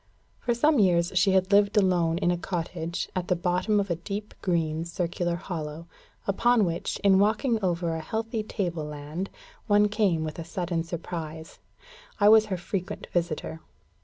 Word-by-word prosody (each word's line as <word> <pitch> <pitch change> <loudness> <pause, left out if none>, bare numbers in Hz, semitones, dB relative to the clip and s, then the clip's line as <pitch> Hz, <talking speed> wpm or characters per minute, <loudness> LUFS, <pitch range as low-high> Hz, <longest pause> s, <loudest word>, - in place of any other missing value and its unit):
For 240 -1 0
some 295 +3 +3
years 175 -3 +3
she 190 +1 +3
had 190 +1 +2
lived 200 +1 +4
alone 175 -4 +3
in 175 -1 +2
a - - +1
cottage, 170 -2 -3
at 180 -1 -2
the 180 - +2
bottom 180 +4 +1
of 200 -2 -1
a - - +2
deep 200 +5 -6
green 165 -3 0
circular 175 0 -2
hollow, 165 -3 -5 0.4
upon 225 +2 +3
which, 170 -1 -2
in 195 -1 +5
walking 220 +2 +2
over 170 -2 0
a 160 - -2
healthy 225 +6 -3
table 175 -7 -3
land, 150 +5 -5 0.4
one 205 0 +4
came 200 -7 +1
with 155 +1 -5
a - - -3
sudden 170 0 -2
surprise. 165 -1 -6 0.6
I 205 0 +6
was 220 0 +7
her 190 -3 -2
frequent 185 +2 -5
visitor. 165 -2 -2
180 Hz, 165 wpm, -27 LUFS, 170-205 Hz, 0.6 s, was